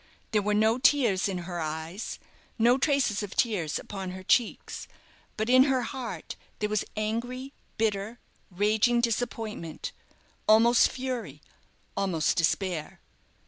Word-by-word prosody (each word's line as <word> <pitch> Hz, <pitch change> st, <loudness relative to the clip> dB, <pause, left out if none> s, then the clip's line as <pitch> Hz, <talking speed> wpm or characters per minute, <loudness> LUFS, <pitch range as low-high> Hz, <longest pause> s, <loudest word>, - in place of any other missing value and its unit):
There 210 Hz, -, +3 dB
were 210 Hz, +1 st, +1 dB
no 220 Hz, +3 st, +3 dB
tears 235 Hz, -9 st, +3 dB
in 190 Hz, -, -2 dB
her 175 Hz, -1 st, -4 dB
eyes, 160 Hz, +5 st, -4 dB, 0.4 s
no 240 Hz, +3 st, +4 dB
traces 275 Hz, -8 st, +2 dB
of 205 Hz, -2 st, -6 dB
tears 185 Hz, -, +1 dB
upon 195 Hz, -2 st, -6 dB
her 185 Hz, +1 st, -7 dB
cheeks, 230 Hz, +4 st, 0 dB, 0.5 s
but 215 Hz, 0 st, -1 dB
in 255 Hz, +2 st, +7 dB
her 265 Hz, -3 st, +1 dB
heart 250 Hz, -1 st, -5 dB, 0.2 s
there 210 Hz, -, -1 dB
was 215 Hz, -1 st, +1 dB
angry, 245 Hz, +5 st, -3 dB, 0.2 s
bitter, 215 Hz, +1 st, -1 dB, 0.3 s
raging 215 Hz, +5 st, +2 dB
disappointment 225 Hz, -7 st, -2 dB, 0.6 s
almost 230 Hz, +2 st, +6 dB
fury, 245 Hz, -, -4 dB, 0.6 s
almost 185 Hz, -6 st, +1 dB
despair. 165 Hz, -1 st, -1 dB
215 Hz, 125 wpm, -28 LUFS, 190-240 Hz, 0.6 s, in